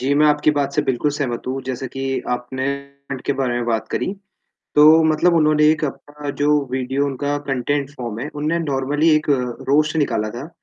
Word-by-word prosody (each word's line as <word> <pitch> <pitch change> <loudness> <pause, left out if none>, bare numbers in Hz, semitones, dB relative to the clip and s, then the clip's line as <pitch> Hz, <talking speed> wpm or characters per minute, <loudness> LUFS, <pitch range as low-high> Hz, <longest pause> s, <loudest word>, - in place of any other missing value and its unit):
जी, 135 +3 0
मैं 150 +1 +4
आपकी 150 0 +3
बात 140 -2 -1
से 150 - +2
बिल्कुल 135 +1 0
सहमत 135 -5 -3
हूँ, 130 +1 -2
जैसे 130 0 -4
कि 135 0 -3
आपने 125 +2 -3 0.4
पॉइंट 130 -2 -4
के - - +1
बारे 135 -3 -1
में 120 0 -1
बात 110 -2 -1
करी, - - -2 0.7
तो 155 +2 +7
मतलब 160 +2 +3
उन्होंने 155 -1 +4
एक 155 0 -1
अपना 145 +1 -7
जो 145 - +3 0.2
वीडियो 130 +2 -1
उनका 145 +1 -2
कंटेंट 140 +1 -1
फ़ॉर्म 120 -5 -5
है, 135 - -4
उन्होंनें 155 +3 -1
नॉर्मली 145 +3 +1
एक 155 0 -1
अ, - - +6 0.4
रोस्ट 155 +3 +3
निकाला 110 -8 0
था। 120 +8 -7
140 Hz, 200 wpm, -20 LUFS, 130-150 Hz, 0.7 s, तो